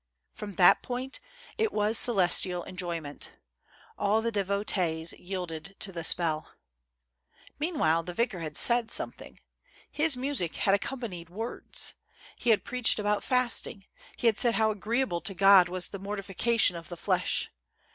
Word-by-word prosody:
From 210 -2 -7
that 180 -1 +6
point 255 +2 -3 0.4
it 445 -1 +1
was 210 +1 +1
celestial 185 -5 +4
enjoyment. 170 -5 -4 0.7
All 215 +2 +2
the 230 - 0
devotees 190 -5 -1
yielded 180 -1 -6
to 195 - -2
the 170 -2 -5
spell. 160 -2 +1 1.1
Meanwhile, 285 - +1
the 175 +1 -7
vicar 230 -5 0
had 155 -2 -4
said 235 -1 +2
something; - - -5 0.5
his 305 -3 0
music 255 - -1
had 195 - +2
accompanied 200 -6 -3
words. 225 +6 -2 0.4
He 245 - -2
had 220 - +4
preached 250 -2 +2
about 210 -1 0
fast 250 -2 +1
ing; 195 -3 -11 0.3
he - - -5
had 225 -2 +3
said 240 -2 +3
how 220 -1 +3
agreeable 215 -2 -1
to 195 - +1
God 195 -1 +6
was 180 0 -3
the 200 - -7
mortifi 195 -1 -6
cation 230 -5 +3
of 165 -1 -9
the 175 - -7
flesh. 180 +1 0
200 Hz, 150 wpm, -28 LUFS, 175-230 Hz, 1.1 s, that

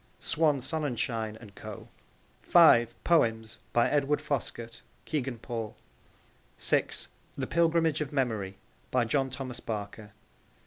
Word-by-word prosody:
(Swan 150 -4 +1
Sonnenschein 120 -7 -2
and 105 -4 -13
Co.) - - -9 0.5
(5) 120 -9 +5
Poems. 115 -9 +2
By 120 - +4
Edward 145 0 +2
Foskett. 120 -6 -4 0.2
(Kegan 135 -5 -2
Paul.) 115 -1 -5 0.8
(6) - - 0 0.3
The - - -2
Pilgrimage 165 -2 +2
of 150 - -3
Memory. 110 -9 -1 0.3
By 125 -2 +2
John 135 +3 +1
Thomas 130 -1 -6
Barker. 105 -1 -6
125 Hz, 115 wpm, -29 LUFS, 115-150 Hz, 0.8 s, 5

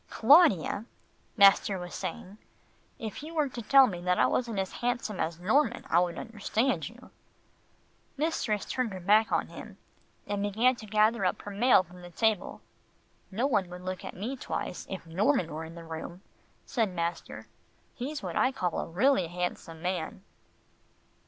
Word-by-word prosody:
"Claudia," 225 - +4 0.5
master 200 -1 +6
was 180 -1 -7
saying, 200 +4 -6 0.6
"if 220 +2 -6
you 320 +3 -9
were 305 -2 +2
to 245 -2 -7
tell 270 +4 +7
me 180 -8 -4
that 180 0 +1
I 125 - +4
wasn't 230 - -1
as 190 -1 -1
handsome 240 -5 -2
as 165 +1 -2
Norman, 240 +6 +1
I 170 - +5
would 175 -2 -1
understand 230 +3 -1
you." - - -16 1.1
Mistress 270 -9 -1
turned 250 -5 -2
her 190 - -6
back 210 +5 +3
on - - 0
him, - - -10 0.5
and 205 -1 -2
began 220 +6 +2
to 215 - -10
gather 215 +1 +2
up 180 - 0
her 205 - -7
mail 210 0 +4
from 180 +1 -15
the 175 - -10
table. 215 +3 0 0.7
"No 220 +7 -1
one 205 -10 +1
would 180 0 -9
look 185 0 -5
at - - -7
me 225 +9 -4
twice, 210 - -5
if 190 -3 -6
Norman 180 - +1
were 160 +1 -5
in 165 +1 -11
the 170 - -9
room," 165 +3 -8 0.4
said 225 -6 0
master. 170 0 -4 0.5
"He's 285 +4 -5
what - - -4
I 260 - +3
call 180 -9 -2
a - - -3
really 195 +1 +2
handsome 175 -2 -5
man." 180 0 -3
200 Hz, 170 wpm, -29 LUFS, 180-240 Hz, 1.1 s, tell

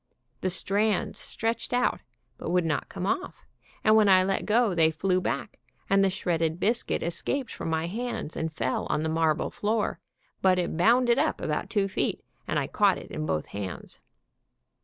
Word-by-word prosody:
The 185 - -1
strands 200 +2 +1
stretched 230 +2 -2
out, 245 0 +2 0.4
but - - -4
would 180 0 +2
not 150 -3 -1
come 185 -2 -4
off, 375 - -3 0.4
and 215 0 +5
when 215 -2 +5
I 185 -1 +6
let 195 +1 -1
go 220 -1 +3
they 165 -2 +4
flew 185 +3 0
back, - - -3 0.3
and 195 0 +5
the 195 - +4
shredded 165 -3 -1
biscuit 230 +5 0
escaped 245 +10 -2
from - - -5
my 160 0 0
hands 225 -3 -4
and 160 0 -2
fell 130 -4 -2
on 155 - 0
the 160 - -1
marble 160 -1 +1
floor, 215 +1 -1 0.4
but 185 -1 +4
it 175 -2 -1
bounded 240 +7 +4
up 310 +2 +1
about - - -2
two 200 -2 +1
feet, 190 - -2 0.2
and - - 0
I - - +1
caught - - +2
it - - -10
in 75 - -3
both 80 -1 -2
hands. 100 -3 -7
190 Hz, 180 wpm, -27 LUFS, 165-220 Hz, 0.4 s, I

